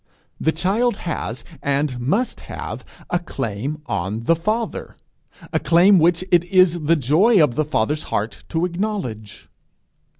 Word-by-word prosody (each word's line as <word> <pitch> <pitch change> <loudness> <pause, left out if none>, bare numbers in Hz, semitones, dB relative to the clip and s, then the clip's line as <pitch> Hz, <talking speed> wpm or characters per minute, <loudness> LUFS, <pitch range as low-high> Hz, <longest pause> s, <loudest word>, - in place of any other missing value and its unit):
The 160 - +2
child 200 +8 0
has, 130 -8 -4 0.2
and 140 -2 -1
must 195 - 0
have, - - -6 0.3
a 175 - +2
claim 140 - -4
on 100 +2 -3
the 165 - +3
father, 215 +8 -3 0.6
a - - +2
claim 180 +3 +5
which 170 +2 +3
it 175 -1 +5
is 175 -3 +3
the 165 +3 +4
joy 165 - +3
of 150 -6 +4
the 155 - +1
father's 150 +2 -1
heart 110 +3 -3
to 165 +1 0
acknowledge. 170 - -4
160 Hz, 140 wpm, -21 LUFS, 130-185 Hz, 0.6 s, claim